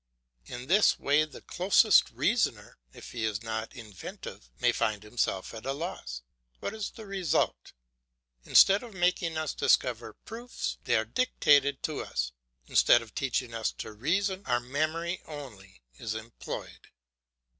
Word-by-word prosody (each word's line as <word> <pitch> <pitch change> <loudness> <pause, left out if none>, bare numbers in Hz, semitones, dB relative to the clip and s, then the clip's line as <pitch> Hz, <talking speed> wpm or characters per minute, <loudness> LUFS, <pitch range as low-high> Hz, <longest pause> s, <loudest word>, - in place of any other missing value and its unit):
In 125 0 -7
this 195 +8 +4
way 145 +2 +3
the 155 - -13
closest 185 +2 +4
reasoner, - - 0
if - - -11
he 115 - -4
is 110 0 -1
not 110 +1 -4
inventive, 105 - -9
may - - +4
find 105 -1 -1
himself 105 -3 -2
at 110 - -8
a 135 - -1
loss. 135 - -6 0.4
What - - -4
is 215 -2 -4
the 220 - -11
result? 195 -5 -1 0.7
Instead 195 +1 +6
of 235 -5 -11
making 175 -2 +1
us 155 -2 -2
discover 115 -3 +1
proofs, 235 - -6
they - - +2
are - - +2
dictated 145 - +3
to 155 - -2
us; - - -2 0.3
instead 120 - +5
of 110 - -15
teaching 130 -2 -1
us 115 -1 -1
to - - -7
reason, 190 - 0
our 120 -1 +2
memory 155 +7 -2
only 105 - -10 0.2
is 110 -1 -3
employed. 110 +1 -7
135 Hz, 145 wpm, -29 LUFS, 110-175 Hz, 0.7 s, Instead